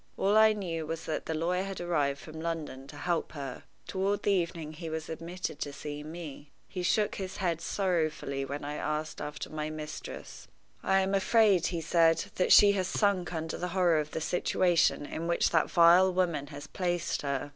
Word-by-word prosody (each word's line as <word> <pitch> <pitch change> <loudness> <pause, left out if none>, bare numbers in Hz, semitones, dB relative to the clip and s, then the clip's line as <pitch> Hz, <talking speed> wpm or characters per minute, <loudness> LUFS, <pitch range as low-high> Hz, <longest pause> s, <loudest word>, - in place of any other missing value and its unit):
All 200 +2 +2
I 220 0 +7
knew 170 -6 -4
was 165 0 -4
that 155 - -3
the 160 - -1
lawyer 175 +3 0
had 195 -1 -5
arrived 145 -5 0
from 160 +1 -9
London 160 -5 -4
to - - -11
help 175 -3 -1
her. 140 -4 -7 0.2
Toward 200 +1 -1
the 205 - +2
evening 170 -4 -1
he 165 +1 -7
was 160 -1 -5
admitted 170 +3 -5
to 145 - -3
see 145 +1 -6
me. 150 -2 -8 0.2
He 185 - -5
shook 205 +4 +1
his 190 -1 -5
head 170 -3 -1
sorrowfully 155 -9 -1
when 140 +1 -5
I 150 +1 -4
asked 155 0 -3
after 150 0 -6
my 155 0 -3
mistress. 155 -1 -8 0.3
"I 195 0 +3
am 190 +1 -1
afraid," 195 -2 +4
he 170 -2 -3
said, 165 0 +3
"that 180 - +2
she 205 - +9
has 190 -2 0
sunk 195 -3 +1
under 160 -1 -4
the 180 - -2
horror 175 -4 +4
of 150 0 -3
the 160 - -4
situation 175 -2 +2
in 165 +3 -5
which 170 - +2
that 160 -2 +2
vile 175 +2 +6
woman 175 -6 0
has 145 -1 -9
placed 175 -3 -2
her. 140 0 -2
165 Hz, 195 wpm, -30 LUFS, 155-185 Hz, 0.3 s, she